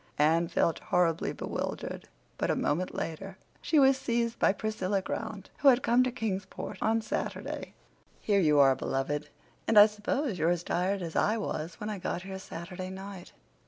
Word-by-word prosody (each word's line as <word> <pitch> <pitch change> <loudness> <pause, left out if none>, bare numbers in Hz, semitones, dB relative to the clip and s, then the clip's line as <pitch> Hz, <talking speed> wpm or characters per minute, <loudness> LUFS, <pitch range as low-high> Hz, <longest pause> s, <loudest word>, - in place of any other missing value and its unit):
Anne 165 +3 +3
felt 165 - +1
horribly 170 -2 +1
bewildered, - - -5 0.3
but - - 0
a - - +2
moment 175 +5 -1
later 190 +4 -5 0.2
she 315 - +1
was 270 -1 +6
seized 235 -3 -1
by - - +5
Priscilla 200 -1 -1
Grant, 195 +1 -5
who 285 - +3
had 255 -1 +6
come 240 +2 +4
to 255 0 +1
Kingsport 200 -5 -4
on 225 0 +2
Saturday. - - -4 0.4
"Here 205 -2 +2
you 150 -5 +4
are, 135 -2 +6
beloved! 145 +3 -2 0.4
And 225 - +3
I 205 - +12
suppose 210 - -2
you're 160 +2 +3
as 175 -1 0
tired 185 +3 0
as 165 -2 -6
I 215 +2 +2
was 165 -6 -4
when 215 -1 -4
I 205 - -4
got 175 0 -3
here 190 0 -6
Saturday 185 +1 -7
night." 190 -1 -8
190 Hz, 175 wpm, -29 LUFS, 170-220 Hz, 0.4 s, I